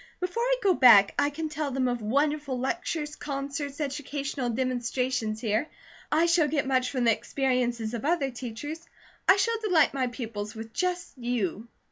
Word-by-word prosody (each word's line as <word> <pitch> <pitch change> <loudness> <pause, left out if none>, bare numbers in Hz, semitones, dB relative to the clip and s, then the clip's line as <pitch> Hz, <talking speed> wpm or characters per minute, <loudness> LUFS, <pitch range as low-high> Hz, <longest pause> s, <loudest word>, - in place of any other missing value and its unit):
Before 365 +6 -2
I - - +3
go 390 -2 +5
back, 235 - +7
I 285 0 +3
can 315 +2 -4
tell 305 -1 -3
them 260 -1 0
of 245 -1 -1
wonderful 285 +4 0
lectures, 300 +2 -2
concerts, 280 0 -4
educational 280 -2 -3
demonstrations 245 -2 -1
here. 220 +6 0 0.4
I 320 +2 +4
shall 335 -2 +3
get 290 -1 0
much 255 -1 +1
from 255 -3 -1
the 230 - +5
experiences 245 -2 -1
of 235 - -4
other 295 -3 +1
teachers. 260 +7 -6 0.5
I 380 - +9
shall 455 +3 0
delight 355 -11 +3
my 260 -2 0
pupils 220 -4 -6
with 225 0 -8
just 360 -1 -2
you." 235 -3 -2
270 Hz, 165 wpm, -27 LUFS, 240-310 Hz, 0.5 s, I